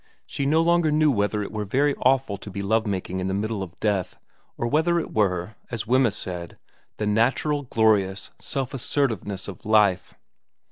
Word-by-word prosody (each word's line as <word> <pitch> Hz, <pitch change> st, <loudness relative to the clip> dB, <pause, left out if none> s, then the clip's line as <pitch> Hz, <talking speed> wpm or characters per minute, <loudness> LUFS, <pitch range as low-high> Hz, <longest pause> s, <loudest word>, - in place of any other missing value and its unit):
She 140 Hz, -, -2 dB
no 160 Hz, +3 st, +3 dB
longer 170 Hz, -1 st, +3 dB
knew 155 Hz, 0 st, +4 dB
whether 105 Hz, -2 st, 0 dB
it -, -, -7 dB
were 105 Hz, -1 st, -3 dB
very 140 Hz, +8 st, +1 dB
awful 130 Hz, -5 st, +2 dB
to 100 Hz, -, -9 dB
be 100 Hz, +1 st, -5 dB
love 110 Hz, +2 st, +1 dB
making 95 Hz, -2 st, -3 dB
in 95 Hz, -, -2 dB
the 95 Hz, -, -1 dB
middle 105 Hz, 0 st, -2 dB
of 90 Hz, -2 st, -8 dB
death, 100 Hz, -4 st, -1 dB, 0.4 s
or -, -, -2 dB
whether 160 Hz, +6 st, +2 dB
it -, -, -6 dB
were, 95 Hz, -2 st, 0 dB, 0.2 s
as 115 Hz, -2 st, -4 dB
Wemyss 125 Hz, -2 st, +2 dB
said, 85 Hz, -2 st, -6 dB, 0.4 s
the 105 Hz, -, -2 dB
natural 125 Hz, +8 st, +1 dB
glorious 110 Hz, -6 st, +1 dB
self 135 Hz, -2 st, -3 dB
assertiveness 115 Hz, -7 st, -1 dB
of 95 Hz, -4 st, -9 dB
life. 105 Hz, -4 st, +2 dB
110 Hz, 180 wpm, -24 LUFS, 100-135 Hz, 0.4 s, knew